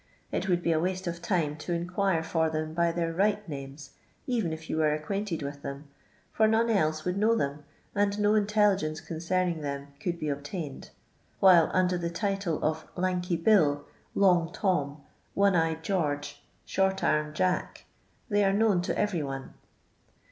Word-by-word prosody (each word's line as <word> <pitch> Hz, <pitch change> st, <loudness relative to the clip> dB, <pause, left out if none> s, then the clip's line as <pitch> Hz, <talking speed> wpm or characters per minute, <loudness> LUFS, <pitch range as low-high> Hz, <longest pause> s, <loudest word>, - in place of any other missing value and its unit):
It 190 Hz, -, -2 dB
would 175 Hz, -1 st, +1 dB
be 170 Hz, -, +2 dB
a 160 Hz, -, +2 dB
waste 185 Hz, +2 st, -2 dB
of 170 Hz, -1 st, -4 dB
time 170 Hz, -6 st, 0 dB
to 175 Hz, +3 st, -4 dB
inquire 175 Hz, 0 st, 0 dB
for 160 Hz, 0 st, +1 dB
them 155 Hz, 0 st, -3 dB
by 170 Hz, 0 st, +2 dB
their 165 Hz, -1 st, -2 dB
right 205 Hz, +3 st, +1 dB
naineS| 140 Hz, -1 st, -8 dB, 0.3 s
even 230 Hz, -10 st, 0 dB
if 160 Hz, 0 st, -7 dB
you -, -, -2 dB
were 155 Hz, -1 st, +3 dB
acquainted 170 Hz, +2 st, -3 dB
with 140 Hz, 0 st, -6 dB
then, 140 Hz, +1 st, -7 dB, 0.4 s
for 220 Hz, -, +4 dB
none 225 Hz, +1 st, +2 dB
else 155 Hz, -6 st, +1 dB
would 180 Hz, +1 st, -1 dB
know 225 Hz, +2 st, +4 dB
them, 145 Hz, -5 st, -2 dB, 0.3 s
and 205 Hz, 0 st, +1 dB
no 205 Hz, 0 st, +3 dB
intelligciu:c 205 Hz, -7 st, +2 dB
concerning 170 Hz, 0 st, -1 dB
them 140 Hz, -1 st, -4 dB
could 175 Hz, +1 st, -2 dB
be 155 Hz, -3 st, -2 dB
ob 140 Hz, 0 st, -4 dB
tained: 150 Hz, -2 st, -6 dB, 0.5 s
while 180 Hz, -4 st, +6 dB
under 180 Hz, -1 st, +2 dB
tho 170 Hz, 0 st, -2 dB
title 190 Hz, -1 st, -1 dB
of 160 Hz, +1 st, -1 dB
Lanky 180 Hz, -1 st, 0 dB
Bill, 160 Hz, -6 st, +3 dB, 0.3 s
long 175 Hz, -4 st, +4 dB
Tom, 150 Hz, -8 st, -1 dB, 0.3 s
One 200 Hz, -1 st, +4 dB
eyed 160 Hz, -1 st, +1 dB
George, 145 Hz, -6 st, -2 dB, 0.2 s
Short 190 Hz, 0 st, 0 dB
anned 150 Hz, 0 st, +1 dB
Jack, 185 Hz, +2 st, -1 dB, 0.4 s
they 205 Hz, -2 st, +2 dB
are 195 Hz, 0 st, +3 dB
known 205 Hz, -3 st, +3 dB
to 175 Hz, -, -2 dB
every 195 Hz, -6 st, 0 dB
one. 135 Hz, -1 st, -5 dB
170 Hz, 170 wpm, -28 LUFS, 155-195 Hz, 0.5 s, while